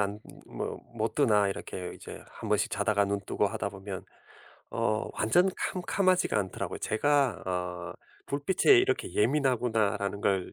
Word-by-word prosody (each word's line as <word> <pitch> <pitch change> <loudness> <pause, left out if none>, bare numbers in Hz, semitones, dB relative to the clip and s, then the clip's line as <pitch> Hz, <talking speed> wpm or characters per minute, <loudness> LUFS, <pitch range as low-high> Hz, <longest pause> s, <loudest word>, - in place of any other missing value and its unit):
안 105 +1 -1 0.3
모 - - -5 0.2
못 110 0 -1
드나. 105 -8 +4
이렇게 90 -2 -5
이제 - - -10
한 - - -8
번씩 - - +1
자다가 105 -1 +2
눈 100 0 -1
뜨고 105 - +1
하다 105 0 -2
보면 95 -1 -7 0.7
어 110 0 0
완전 175 - +3 0.2
캄캄하지가 185 - +1
않더라고요. 95 -2 -3
제가 140 +2 +1
어 90 -1 -3 0.3
'불빛에 185 - +4
이렇게 390 +1 +1
예민하구나.'라는 115 -6 +1
걸 95 -3 0
110 Hz, 300 characters per minute, -29 LUFS, 100-140 Hz, 0.7 s, 드나